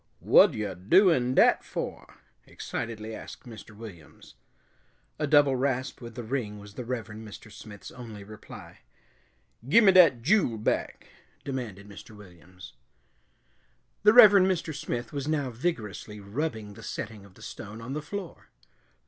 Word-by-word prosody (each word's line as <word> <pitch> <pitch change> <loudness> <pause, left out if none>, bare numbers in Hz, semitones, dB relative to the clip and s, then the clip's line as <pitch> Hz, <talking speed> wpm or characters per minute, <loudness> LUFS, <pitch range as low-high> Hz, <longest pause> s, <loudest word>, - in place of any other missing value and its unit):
"Whad - - +5
yo' 105 -3 -3
doin' 125 - +3
dat - - +5
for?" - - -6 0.3
excitedly 110 -1 -6
asked - - -10
Mr. 110 -2 -12
Williams. 95 -9 -13 0.9
A 150 - 0
double 145 -2 +5
rasp 130 0 -2
with 115 -1 -9
the 120 - -6
ring 110 -3 -3
was 100 0 -12
the 125 - -6
Reverend 110 -3 -6
Mr. 105 +1 -12
Smith's 105 -1 -11
only 115 -5 -10
reply. 105 +1 -12 0.9
"Gimme 210 +3 +7
dat 170 -11 +6
jule 165 - +2
back!" 110 - -2 0.4
demanded 115 -8 -6
Mr. 105 +2 -12
Williams. 90 -2 -14 1.3
The 210 - +6
Reverend 205 -6 +8
Mr. 175 -4 -1
Smith 120 -4 -5
was 140 -1 -4
now 145 -4 -1
vigorously 110 - -4
rubbing 110 0 -4
the - - -13
setting 105 -2 -6
of 100 -2 -18
the - - -15
stone 110 +2 -9
on 120 +4 -7
the 150 - -3
floor. 195 +2 -8
115 Hz, 140 wpm, -27 LUFS, 105-145 Hz, 1.3 s, Reverend